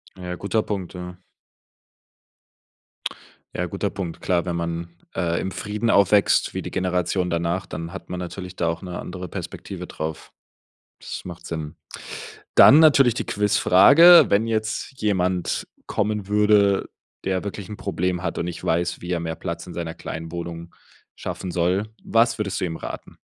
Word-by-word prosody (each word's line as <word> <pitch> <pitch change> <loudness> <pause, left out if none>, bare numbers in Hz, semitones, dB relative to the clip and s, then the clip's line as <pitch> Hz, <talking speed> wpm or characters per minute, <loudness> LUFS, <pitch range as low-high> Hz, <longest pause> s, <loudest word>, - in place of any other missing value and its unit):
Ja, 90 -1 -5
guter 105 +4 0
Punkt, 95 -4 -4
ja. 90 0 -7 2.4
Ja, 90 - -1
guter 100 +3 -2
Punkt. 90 -5 -6
Klar, 90 -1 +1
wenn 85 -1 -2
man, 85 0 -3 0.3
äh, 85 -1 0
im 95 - -3
Frieden 105 +4 -2
aufwächst, 100 -1 +4
wie - - -3
die - - -7
Generation 90 0 0
danach, 85 +2 -1
dann 85 +2 -6
hat - - -9
man 90 0 -4
natürlich 90 +1 -6
da 85 - 0
auch 85 0 -2
'ne 90 -2 -6
andere 90 0 -6
Perspektive - - -7
drauf. 80 0 -6 0.7
Das - - -7
macht 85 -1 -9
Sinn. 80 -2 -5 0.8
Dann 145 - +9
natürlich 135 -6 +6
die - - -3
Quizfrage: 105 - +7
Wenn 105 +3 +3
jetzt 110 +4 -2
jemand 95 -4 0 0.2
kommen 105 -1 -1
würde, 105 -1 +3 0.4
der 95 0 -1
wirklich 100 -2 -6
'n 105 - -7
Problem 90 -2 -2
hat 85 - -3
und 85 - -2
nicht 85 - -6
weiß, 85 +1 0
wie 90 - -6
er 85 -2 0
mehr 80 -1 -4
Platz 85 -1 -5
in 90 - -9
seiner 85 -1 -4
kleinen 80 +1 -7
Wohnung 85 0 -6 0.4
schaffen 95 - -5
soll, 90 +4 +1 0.2
was 115 +1 +2
würdest 100 -2 -2
du - - 0
ihm 80 -2 -3
raten? - - -8
90 Hz, 160 wpm, -23 LUFS, 85-100 Hz, 2.4 s, Dann